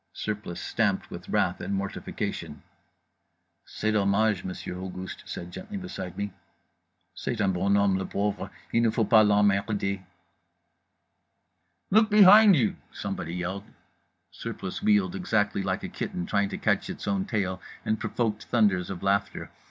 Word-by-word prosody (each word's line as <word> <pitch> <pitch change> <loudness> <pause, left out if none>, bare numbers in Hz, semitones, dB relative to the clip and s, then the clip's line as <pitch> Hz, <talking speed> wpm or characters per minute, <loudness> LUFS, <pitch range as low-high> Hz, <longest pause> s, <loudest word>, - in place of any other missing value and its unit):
Surplice 105 -5 -4
stamped - - -1
with - - -8
wrath - - +1
and 100 - -2
mortification. 100 0 -4 1.0
"C'est 110 - -1
dommage," 105 -1 +2
Monsieur 90 -1 -5
Auguste 95 0 -6
said 85 0 -6
gently 210 - -7
beside 175 - -6
me. 100 -1 -3 0.8
"C'est 120 - -4
un 100 -3 +2
bon 100 +3 +2
homme, 100 -2 +3
le 95 - -3
pauvre, 100 0 -2 0.2
il 115 - +4
ne 115 - +4
faut 110 0 +1
pas 110 -2 +7
l'em 105 0 +4
merd 100 +1 +1
er." 100 -1 -1 1.9
"Look 215 +2 +5
behind 210 0 +8
you!" 120 -8 +1
somebody 85 +2 -4
yelled. 95 +3 -4 0.7
Surplice 95 - -6
wheeled, 205 -3 +3
exactly 110 - 0
like 95 -1 -2
a - - -3
kitten 90 - -4
trying 100 +1 +1
to - - -4
catch - - 0
its - - -6
own 100 -1 0
tail, 95 -4 -2 0.2
and 110 - 0
provoked 110 -3 -2
thunders 100 -6 +2
of 95 -2 -6
laughter. 100 +1 0
100 Hz, 150 wpm, -27 LUFS, 95-110 Hz, 1.9 s, behind